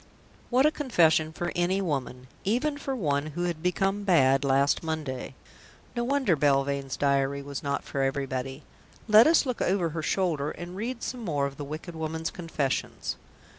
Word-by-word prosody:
What 260 +3 +4
a 305 - +5
confession 165 - +3
for 175 +2 -3
any 180 +2 +1
woman 135 -8 -3 0.2
even 255 +9 +1
for 270 -2 -3
one 145 - 0
who 175 - 0
had 170 -3 -2
become 195 +3 0
bad 135 -8 +4
last 140 +1 +3
Monday! 150 -6 -4 0.6
No 240 - 0
wonder 265 -8 +2
Belvane's 140 -1 +1
diary 140 0 +1
was 140 -1 -5
not 140 0 -2
for 135 - -3
everybody. 135 0 -2 0.4
Let 215 +3 +8
us 325 -2 +5
look 250 -3 -3
over 180 -3 +1
her 160 +1 -4
shoulder 155 -3 0
and 175 +1 -7
read 235 +4 -4
some 250 - -4
more 145 -7 0
of 140 0 -5
the 145 - -5
wicked 155 +4 -7
woman's 160 0 -3
confessions. 160 -6 -2
160 Hz, 170 wpm, -27 LUFS, 140-195 Hz, 0.6 s, Let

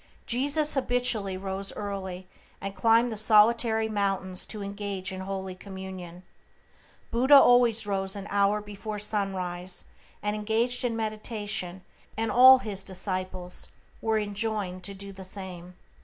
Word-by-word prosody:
Jesus 285 +5 +1
habitually 245 -7 +1
rose 195 +1 -4
early, 190 -3 -5 0.3
and 195 0 -6
climbed 230 +2 +3
the 220 - -5
solitary 220 +1 +4
mountains 195 -3 -2
to 210 -2 -5
engage 200 -1 -4
in 190 - -6
holy 190 0 -5
communion. 185 -2 -9 0.9
Buddha 260 +5 +5
always 245 -4 +6
rose 195 -1 0
an 200 -1 -6
hour 200 +1 +2
before 210 +1 -7
sunrise 185 -3 -1 0.4
and 210 0 -1
engaged 225 +4 +1
in 240 -2 -1
meditation, 215 -4 -3 0.3
and 225 0 -1
all 260 +1 +9
his 210 -6 -2
disciples 185 -1 -3 0.3
were 220 -1 +1
enjoined 205 -3 -2
to 200 - -5
do 200 +1 -7
the 190 0 -10
same. 185 -2 -8
200 Hz, 130 wpm, -27 LUFS, 190-225 Hz, 0.9 s, all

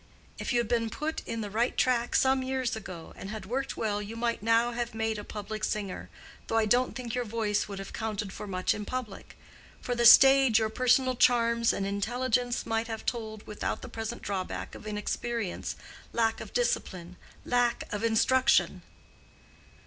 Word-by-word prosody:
"If - - -3
you 240 - +3
had 235 - 0
been 230 -1 0
put 310 +7 -3
in 230 - -3
the 205 -1 -5
right 230 +4 0
track 245 -2 +2
some 265 0 +3
years 260 -2 -1
ago 185 -6 -8
and 195 - -8
had 215 -2 -6
worked 270 +6 -3
well 210 -2 -1
you 210 +2 -7
might 235 -1 -1
now 230 +2 +3
have 240 -1 -4
made 220 -1 -1
a - - -6
public 215 +1 -6
singer, 200 -3 -3 0.4
though 225 - 0
I 225 - +3
don't 245 +4 +2
think 245 -3 -5
your 250 - 0
voice 215 -2 -1
would 200 -1 -7
have 195 - -7
counted 210 -3 -3
for 210 - -7
much 185 -1 0
in 210 - -5
public. 235 -3 -6 0.4
For 245 - -3
the 235 -1 +5
stage 270 -3 +8
your 220 -1 +1
personal 255 +2 +2
charms 235 -1 +3
and 195 - -2
intelligence 240 +4 0
might 225 0 -1
then 225 - -3
have - - -14
told 220 -3 -4
without 210 - -4
the - - -7
present 225 0 -5
drawback 190 -2 -4
of - - -10
inexperience—lack 225 +1 -3
of - - -8
discipline—lack 240 - -1
of 210 +1 -3
instruction." 240 +3 +3
225 Hz, 180 wpm, -29 LUFS, 210-245 Hz, 0.4 s, stage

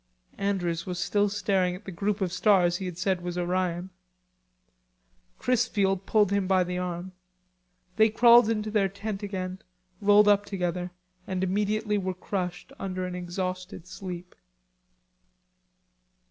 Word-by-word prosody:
Andrews 180 -4 -1
was 180 -1 -3
still 205 +3 +1
staring 195 -3 0
at 190 - -12
the 195 - -6
group 200 +4 -2
of 180 -2 -1
stars 180 -3 +3
he 190 - -4
had 175 -2 -6
said 185 0 0
was 175 0 -4
Orion. 180 0 -1 1.5
Chrisfield 200 -6 +1
pulled 210 -3 +3
him 200 -2 +1
by 185 -1 +4
the 180 0 -3
arm. 180 0 -4 0.9
They 220 0 +6
crawled 235 +1 +6
into 215 -1 -1
their 205 -2 +2
tent 200 +1 -5
again, 190 -2 -4 0.4
rolled 205 +1 +6
up 205 0 +5
together 180 -3 -3 0.4
and 185 0 -2
immediately 210 +2 0
were 185 -1 -3
crushed 180 -1 -4
under 185 -1 -3
an 180 - -5
exhausted 180 0 -4
sleep. 180 -1 -8
190 Hz, 135 wpm, -27 LUFS, 180-205 Hz, 1.5 s, They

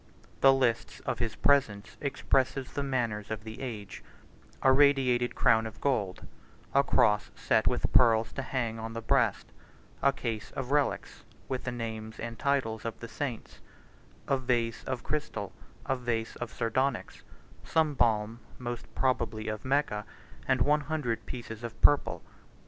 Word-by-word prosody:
The 135 - +7
lists 130 -4 +1
of - - -3
his 115 -2 -2
presents 120 -8 +2
expresses 135 -1 0
the 145 - -2
manners 120 -7 -1
of 110 -1 -4
the 110 +2 -8
age—a 120 +2 -4
radiated 130 -3 +4
crown 110 0 +4
of 110 - -11
gold, 105 -10 -1 0.5
a - - +5
cross 105 0 +3
set - - +2
with - - +1
pearls 115 -2 +5
to - - -3
hang 115 -3 -2
on 115 0 -5
the 115 - -4
breast, 115 -3 +1 0.5
a 140 - +5
case 115 -5 -4
of 135 0 -4
relics, 145 -1 0 0.2
with 130 -2 -3
the 125 - -1
names 110 -2 -5
and 115 0 -6
titles 135 -7 0
of 115 - -5
the 115 - -7
saints, 125 -1 -5 0.7
a 135 - +2
vase 120 -2 0
of 130 -2 -3
crystal, 150 -1 -3 0.3
a 135 - +1
vase 120 -3 -2
of 120 -2 -5
sardonyx, 125 +2 -1 0.4
some 160 -2 +2
balm, 115 -3 +1 0.2
most 120 -1 -5
probably 115 -4 0
of 110 -1 -4
Mecca, 130 -6 +1 0.4
and 130 -1 +2
one 150 +1 +3
hundred 145 -6 -2
pieces 120 -2 -7
of 115 -1 -6
purple. 145 -1 +3
120 Hz, 150 wpm, -30 LUFS, 110-135 Hz, 0.7 s, The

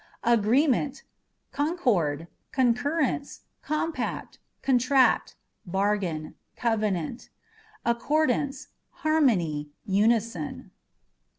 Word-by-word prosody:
Agreement 245 +5 +3
â€" 270 - -15 0.5
concord, 215 - 0 0.2
concurrence, 270 +3 0 0.2
compact, 310 +1 -3 0.2
contract, 260 0 +3 0.3
bar 195 +3 +1
gain, 160 -6 -4 0.2
covenant; 215 -3 -1 0.6
accordance, 275 +3 0 0.2
harmony, 190 - +1 0.2
unison. 210 -4 0
235 Hz, 65 wpm, -27 LUFS, 195-280 Hz, 0.6 s, Agreement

